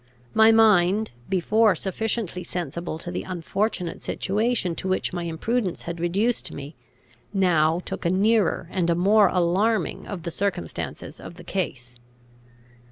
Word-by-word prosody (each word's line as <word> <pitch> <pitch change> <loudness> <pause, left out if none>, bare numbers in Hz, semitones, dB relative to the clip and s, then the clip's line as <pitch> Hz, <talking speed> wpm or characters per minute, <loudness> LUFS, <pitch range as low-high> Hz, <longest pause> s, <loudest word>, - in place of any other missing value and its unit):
My 220 0 +7
mind, 215 -2 +4 0.2
before 205 +3 +3
sufficiently 195 0 -3
sensible 170 -2 -4
to 175 +2 -6
the 175 - -3
unfortunate 185 +1 -2
situation 210 -2 0
to - - -4
which 185 0 0
my 175 -1 -3
imprudence 185 +4 -2
had 170 0 -5
reduced 200 +8 0
me, 145 +2 -8 0.6
now 170 -3 +3
took - - -5
a 170 - +2
nearer 200 -2 +2
and 175 -3 0
a 170 - +3
more 200 +4 +5
alarming 190 +6 +1
view - - -13
of 185 -5 -5
the 170 - -4
circumstances 190 - -4
of - - -10
the 175 - -12
case. 130 -10 -4
185 Hz, 145 wpm, -24 LUFS, 170-215 Hz, 0.6 s, My